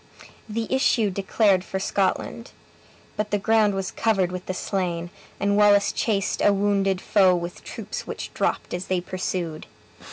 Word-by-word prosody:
The 225 Hz, +1 st, -2 dB
issue 235 Hz, -5 st, +2 dB
declared 195 Hz, 0 st, +2 dB
for 190 Hz, -, -4 dB
Scotland. 200 Hz, +5 st, -1 dB, 0.6 s
But 210 Hz, 0 st, -1 dB
the 205 Hz, -, +1 dB
ground 215 Hz, 0 st, +3 dB
was 195 Hz, -1 st, -3 dB
covered 195 Hz, -5 st, +1 dB
with 185 Hz, 0 st, -6 dB
the 185 Hz, -, -2 dB
slain, 175 Hz, -3 st, -2 dB, 0.3 s
and 200 Hz, 0 st, +1 dB
Wallace 205 Hz, -1 st, +5 dB
chased 205 Hz, -3 st, -1 dB
a 205 Hz, -, +6 dB
wounded 195 Hz, -1 st, +1 dB
foe 190 Hz, -2 st, +4 dB
with 175 Hz, 0 st, -5 dB
troops -, -, -6 dB
which -, -, -6 dB
dropped -, -, -1 dB
as 180 Hz, +1 st, -3 dB
they 185 Hz, -1 st, +1 dB
pursued. 175 Hz, -3 st, -4 dB
195 Hz, 155 wpm, -24 LUFS, 185-205 Hz, 0.6 s, a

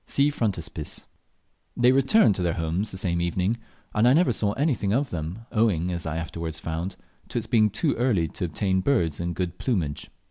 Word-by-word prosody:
(See 140 Hz, +1 st, +3 dB
Frontispiece.) 85 Hz, -, -3 dB, 0.7 s
They 125 Hz, +1 st, +5 dB
returned 135 Hz, -, +5 dB
to 95 Hz, -, -3 dB
their 85 Hz, -2 st, 0 dB
homes 85 Hz, +6 st, -1 dB
the 95 Hz, -, -4 dB
same 85 Hz, -2 st, -1 dB
evening, 90 Hz, +6 st, 0 dB, 0.4 s
and 110 Hz, +3 st, +3 dB
I 125 Hz, -, +6 dB
never 170 Hz, -1 st, +4 dB
saw 105 Hz, -1 st, 0 dB
anything 135 Hz, -8 st, 0 dB
more 110 Hz, -, +3 dB
of 140 Hz, -1 st, -2 dB
them, 85 Hz, +5 st, -4 dB
owing, 95 Hz, -6 st, +2 dB
as 85 Hz, -2 st, -2 dB
I 80 Hz, 0 st, -2 dB
afterwards 85 Hz, -1 st, -4 dB
found, 85 Hz, +3 st, -4 dB, 0.3 s
to -, -, -5 dB
its -, -, -1 dB
being 110 Hz, -2 st, +3 dB
too 145 Hz, -, 0 dB
early 110 Hz, -9 st, +2 dB
to -, -, -3 dB
obtain 95 Hz, +3 st, 0 dB
birds 85 Hz, -, +1 dB
in 85 Hz, 0 st, -2 dB
good 90 Hz, 0 st, -3 dB
plumage. 85 Hz, -, -2 dB
95 Hz, 200 wpm, -25 LUFS, 85-120 Hz, 0.7 s, I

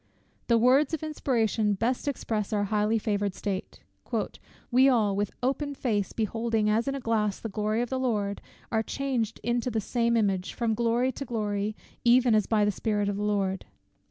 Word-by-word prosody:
The 235 Hz, -, +4 dB
words 265 Hz, +6 st, +4 dB
of 315 Hz, -, -9 dB
inspiration 225 Hz, -8 st, 0 dB
best 245 Hz, +7 st, -1 dB
express 220 Hz, -6 st, -2 dB
our 205 Hz, -1 st, +1 dB
highly 210 Hz, +2 st, +1 dB
favoured 205 Hz, -2 st, -1 dB
state: 195 Hz, -2 st, -4 dB, 0.9 s
"We 260 Hz, +2 st, +6 dB
all, 215 Hz, -6 st, +2 dB
with 205 Hz, 0 st, 0 dB
open 280 Hz, +2 st, -1 dB
face 210 Hz, -7 st, -1 dB
beholding 225 Hz, 0 st, 0 dB
as 225 Hz, +4 st, +1 dB
in 275 Hz, -, 0 dB
a -, -, -3 dB
glass 215 Hz, -4 st, 0 dB
the 225 Hz, -, -5 dB
glory 215 Hz, +3 st, 0 dB
of 245 Hz, -, -6 dB
the 260 Hz, -, 0 dB
Lord, 210 Hz, -6 st, -1 dB, 0.3 s
are 220 Hz, -, +2 dB
changed 240 Hz, -2 st, -2 dB
into 240 Hz, +1 st, 0 dB
the 225 Hz, -2 st, -1 dB
same 235 Hz, +2 st, +1 dB
image, 195 Hz, -4 st, 0 dB
from 230 Hz, -2 st, 0 dB
glory 235 Hz, +3 st, +1 dB
to 275 Hz, -, -6 dB
glory, 210 Hz, -3 st, -2 dB, 0.3 s
even 245 Hz, 0 st, +5 dB
as 215 Hz, -2 st, +3 dB
by 215 Hz, -2 st, +3 dB
the 205 Hz, -, +2 dB
Spirit 205 Hz, 0 st, -1 dB
of 200 Hz, -, -2 dB
the -, -, -3 dB
Lord." 195 Hz, -, 0 dB
225 Hz, 185 wpm, -28 LUFS, 205-245 Hz, 0.9 s, We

